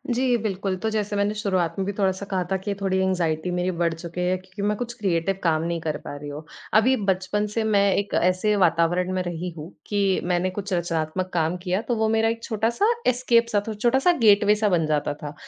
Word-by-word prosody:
जी, 250 0 +2
बिल्कुल। 195 -3 -2
तो 220 - +1
जैसे 210 -1 -2
मैंने 200 +1 +1
शुरुआत 185 -6 -1
में 190 - 0
भी 200 - -2
थोड़ा-सा 190 -1 -1
कहा 185 -2 0
था 190 - +2
कि 200 +2 -3
थोड़ी 190 -1 +1
एंग्ज़ायटी 180 -3 0
मेरी 180 +1 0
बढ़ 170 -1 +1
चुकी 170 +2 -6
है, 180 +1 +1
क्योंकि 185 +2 -10
मैं 210 - +1
कुछ 240 +1 -4
क्रिएटिव 190 -1 0
काम 160 -2 +2
नहीं 170 0 -2
कर 155 -1 -2
पा - - -7
रही 145 0 -7
हूँ। 145 +2 -7 0.3
अभी 230 +5 +5
बचपन 195 +2 0
से 225 - +1
मैं 200 -2 +3
एक 200 0 -2
ऐसे 185 +4 +2
वातावरण 175 0 +2
में 185 - 0
रही 175 0 -4
हूँ, 155 +2 -7 0.2
कि 200 -2 +1
मैंने 180 +1 0
कुछ 195 +1 -5
रचनात्मक 175 +1 -1
काम 165 +1 0
किया, 185 +2 0
तो 235 +1 -2
वो 220 0 +1
मेरा 225 0 +2
एक 230 0 -4
छोटा-सा 230 - +1 0.2
एस्केप 240 -2 +3
सा 205 -2 +2
था 220 - -2
छोटा-सा 255 +9 +3
गेटवे 210 -1 +5
सा 210 0 +1
बन 170 -4 +2
जाता 150 -1 0
था। 145 0 -8
190 Hz, 225 wpm, -24 LUFS, 175-210 Hz, 0.3 s, अभी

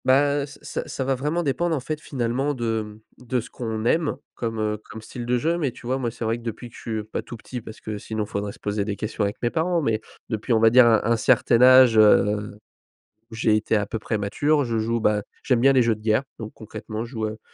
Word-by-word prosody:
Ben, 140 +2 +3
heu, - - -2
c 145 - -13
c - - -4
ça 135 - -3
va 135 +1 +1
vraiment 150 +7 -1
dépendre, 165 +3 0
en - - -1
fait, 150 +3 -5
finalement 135 +2 -1
de, 115 -2 -1
hem, 105 0 -8 0.3
de 125 +1 +1
ce 115 0 -8
qu'on 110 -2 -4
aime 155 +4 +1 0.2
comme, 115 -1 -4
heu, 105 0 -1
comme 110 0 -8
style 120 +2 -7
de 125 +1 +2
jeu. 165 +7 0
Mais 140 -6 0
tu - - -14
vois, 130 +2 -1
moi, 120 -3 -1
c'est 115 0 -6
vrai 115 +1 0
que - - -12
depuis 115 +1 -6
que - - -17
je - - -11
suis 110 -2 -3
pas 110 - -4
tout 120 - -9
petit, 125 +2 -7
parce 110 0 -11
que 110 -1 -5
sinon, 110 0 -3
faudrait 100 0 -4
se - - -16
poser 105 0 -1
des 100 0 -3
questions 110 +1 -3
avec 100 0 -2
mes 120 - +1
parents. 170 +1 +1
Mais, 110 -4 0 0.3
depuis, 110 +1 -1
on 110 - +4
va 115 0 +6
dire 125 0 +7
un 110 -2 +4
un 115 +2 +2
certain 120 0 +3
âge, 130 -2 +7
heu, 105 -1 +4 0.7
où - - -10
j'ai 110 -1 +2
été 110 +1 +1
à 105 -1 0
peu 110 - -4
près 110 - -2
mature. 145 +9 +1
Je 115 -2 -2
joue, 115 +2 0
bah 105 -1 +2 0.2
j'aime 125 -3 +2
bien 135 +3 +6
les 130 -2 +4
jeux 115 -1 +2
de 105 - -14
guerre. 110 +4 +2
Donc 110 -1 -7
concrètement, 110 +1 -6
je 120 - -11
joue, 110 -3 -3
heu 110 0 -6
115 Hz, 270 wpm, -24 LUFS, 110-130 Hz, 0.7 s, dire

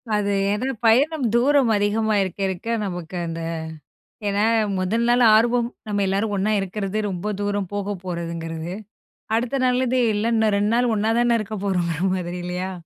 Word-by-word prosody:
அது 205 -1 0 0.2
ஏன்னா, 210 +6 -1 0.2
பயணம் 275 +5 +3
தூரம் 265 -1 +4
அதிகமா 215 +1 +1
இருக்க 190 +1 -6
இருக்க, 190 +4 -6 0.2
நமக்கு 180 -2 -6
அந்த 165 0 -5 0.9
ஏன்னா, 205 +2 +1 0.3
முதல் 225 +6 0
நாள் 245 0 +4
ஆர்வம் 235 +1 +2 0.2
நம்ம 205 -1 0
எல்லாரும் 200 +2 0
ஒண்ணா 205 +3 +1
இருக்கிறது, 195 +1 -3
ரொம்ப 195 +3 -3
தூரம் 205 -2 -2
போக 205 0 -2
போறதுங்கிறது. 170 -1 -4 0.6
அடுத்த 250 +4 -1
நாள்லருந்து, 255 0 +2
எல்லாம் 225 +3 +1
இன்னும் 215 -2 +2
2 210 +2 +1
நாள் 245 -1 +2
ஒண்ணா 215 +2 +1
தானே 240 -1 +3
இருக்க 215 0 -5
போறோங்கிற 175 -4 -1
மாதிரி 180 -1 -4
இல்லையா? 180 +1 -3
205 Hz, 155 wpm, -22 LUFS, 185-230 Hz, 0.9 s, தூரம்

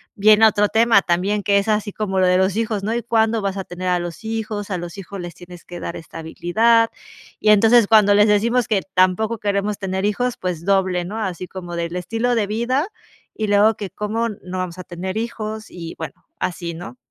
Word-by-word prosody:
viene 215 +2 +6
otro 210 -1 +2
tema 225 -3 +4
también, 195 +4 0
que 200 -1 +3
es 200 - -3
así 210 -1 0
como 195 -3 -2
lo 185 - +4
de 180 0 +4
los 190 +1 +1
hijos, 220 -3 -1
¿no? 215 - -1
Y: 235 - -2
"¿Cuándo 225 -2 +1
vas 195 0 -2
a 190 - -3
tener 180 +1 -4
a 180 -1 +2
los 175 +4 -6
hijos? 215 -2 -4
A 180 - -1
los 175 +2 -7
hijos 195 +1 -8
les 175 -1 -7
tienes 175 -1 -13
que 175 -1 -9
dar 170 - -5
estabilidad". 175 +8 +1 0.5
Y 215 - +2
entonces, 225 +2 +6
cuando 205 -2 +5
les 210 +1 +5
decimos 235 +4 +2
que 205 -4 +1
tampoco 185 +5 +2
queremos 205 0 -1
tener 190 0 -2
hijos, 240 +4 -1
pues, 175 -2 -4
doble, 190 -3 +2
¿no? 210 +5 -6
Así 185 -3 -4
como 175 -2 -7
del 170 +1 -3
estilo 225 +7 -1
de 210 -3 +1
vida 250 - 0 0.5
y 215 -1 -2
luego 205 +2 +4
que 200 -3 -6
cómo 215 +5 -2
no 185 -3 -7
vamos 185 -1 -4
a 185 - -7
tener 185 +3 -5
hijos. 220 -1 -4
Y, 165 -2 -8
bueno, 160 - -6 0.3
así, 170 -1 -3
¿no? 175 +9 -9
200 Hz, 215 wpm, -21 LUFS, 180-220 Hz, 0.5 s, viene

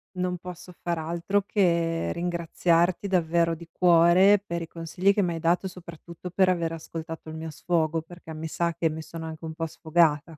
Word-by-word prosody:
non 180 0 -1
posso 180 0 -10
far 170 -1 -1
altro 170 +5 0
che 170 -5 +1
ringraziarti 170 +1 +1
davvero 170 -2 +2
di 170 +1 -12
cuore 180 +3 +5
per 170 -3 -3
i 165 - -5
consigli 170 +4 0
che 205 - +1
mi 175 -2 0
hai 165 - -4
dato, 175 +4 +1
soprattutto 170 -1 -10
per 185 +1 +3
aver 170 -3 0
ascoltato 165 0 -7
il 155 - -7
mio 160 0 -5
sfogo, 165 0 0
perché 165 0 -11
mi 155 +1 -5
sa 170 +1 -1
che 165 0 0
mi 160 +1 -5
sono 160 +1 -8
anche 160 0 -7
un 160 - -5
po' 165 +1 -3
sfogata, 160 -1 +1
170 Hz, 190 wpm, -26 LUFS, 160-180 Hz, -, cuore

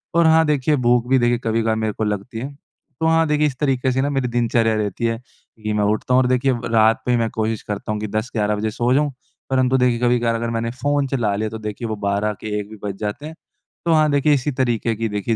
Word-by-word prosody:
और 170 0 +5
हाँ, 160 0 +5
देखिए, 150 0 +2
भूख 120 -2 +2
भी 130 0 +4
देखिए, 120 0 +2
कभी-कभार 115 0 +1
मेरे 110 -1 -1
को - - -3
लगती 105 +2 -3
है। 135 +4 -6 0.5
तो 160 - +1
हाँ, 165 0 +4
देखिए, 150 0 +2
इस 130 -3 -5
तरीके 130 -3 +1
से 130 +1 0
ना 140 - 0
मेरी 135 -3 -1
दिनचर्या 115 -2 +1
रहती 105 +1 -2
है 115 0 0 0.5
कि 105 0 -1
मैं 105 0 +1
उठता 105 +4 0
हूँ 130 - +6
और 125 - +1
देखिए, 130 +1 +2
व 120 -1 -3
रात 110 0 +4
पे 125 - +1
ही 120 - +3
मैं 115 -1 0
कोशिश 110 0 -2
करता 105 +1 -4
हूँ 105 - -2
कि 110 - -3
10-11 105 0 -1
बजे 110 +1 -2
सो 120 +2 +1
जाऊँ। 145 +1 +2 0.4
परंतु 130 0 +2
देखिए, 125 -2 +2
कभी-कभार 120 -1 +2
अगर 115 +1 -2
मैंने 115 0 -2
फ़ोन 140 +3 0
चला 120 -7 0
लिया 110 +1 -2
तो 110 - -6
देखिए, 105 +2 -5
वो 110 - -2
12 100 +1 -1
के 105 -1 -3
1 105 0 -7
भी 110 - -10
बज 100 -1 -4
जाते 105 +7 -4
हैं। 160 +1 -8 0.5
तो 165 - +3
हाँ, 155 -1 +4
देखिए, 145 +1 +3
इसी 145 +1 0
तरीके 120 -3 0
की 115 +1 -2
देखिए, 105 +2 -1
120 Hz, 260 wpm, -21 LUFS, 110-130 Hz, 0.5 s, हूँ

